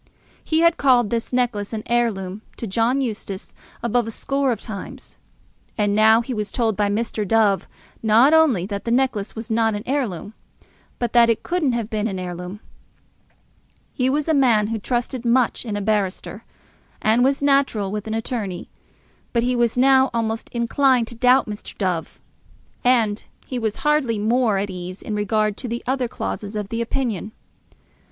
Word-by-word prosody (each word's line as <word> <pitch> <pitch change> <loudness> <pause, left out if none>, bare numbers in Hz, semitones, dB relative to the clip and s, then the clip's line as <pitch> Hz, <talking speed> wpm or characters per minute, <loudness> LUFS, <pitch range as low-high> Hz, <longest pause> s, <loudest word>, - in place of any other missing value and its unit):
He 315 0 +1
had 335 0 +4
called 245 -6 +3
this 230 -1 -2
necklace 235 -5 -1
an 215 -1 -3
heirloom 215 -5 -1 0.2
to - - -4
John 230 +6 +1
Eustace 205 -5 -5 0.3
above 235 0 +1
a - - -3
score 275 +4 -1
of 225 - -2
times; 205 -5 -9 0.6
and 205 -2 +1
now 220 +2 +5
he 250 +2 -5
was 210 -3 -3
told 225 -4 0
by 205 0 +1
Mr. 215 +1 -1
Dove 205 -1 +2 0.3
not 230 +7 +5
only 290 - +4
that 200 0 -5
the - - -2
necklace 240 -4 0
was 225 0 -6
not 225 -1 +2
an 205 - -5
heirloom, 225 - -2 0.6
but 240 -2 -2
that 235 -1 +6
it 230 - +1
couldn't 335 -7 0
have 230 -3 -2
been 215 -1 -1
an 195 -4 -4
heirloom. 180 +2 -6 1.3
He 255 0 +1
was 295 +3 0
a 320 - +3
man 235 -7 +3
who 225 -1 -2
trusted 245 +2 -2
much 245 0 +1
in 205 -2 -2
a - - -3
barrister, 205 -2 -2 0.6
as 220 +2 +3
was 270 +3 +2
natural 275 -8 +2
with 210 +1 -4
an 220 - -2
attorney; 220 -6 -4 0.6
but 235 -1 +2
he 250 +1 +1
was 240 0 +1
now 265 +1 +5
almost 225 -1 -2
inclined 245 0 +2
to 235 - -9
doubt 250 +3 +4
Mr. 210 -1 -8
Dove. 180 -5 -2 0.6
And 230 -4 +2 0.2
he 255 - -4
was 220 -3 -1
hardly 295 -7 +2
more 220 0 +2
at 200 0 -2
ease 180 +1 -7
in 215 - -4
regard 210 0 0
to 255 - -5
the 235 +1 -4
other 260 0 0
clauses 215 -3 -5
of 210 -2 -3
the 230 0 -2
opinion. 230 -4 -2
225 Hz, 175 wpm, -22 LUFS, 210-250 Hz, 1.3 s, that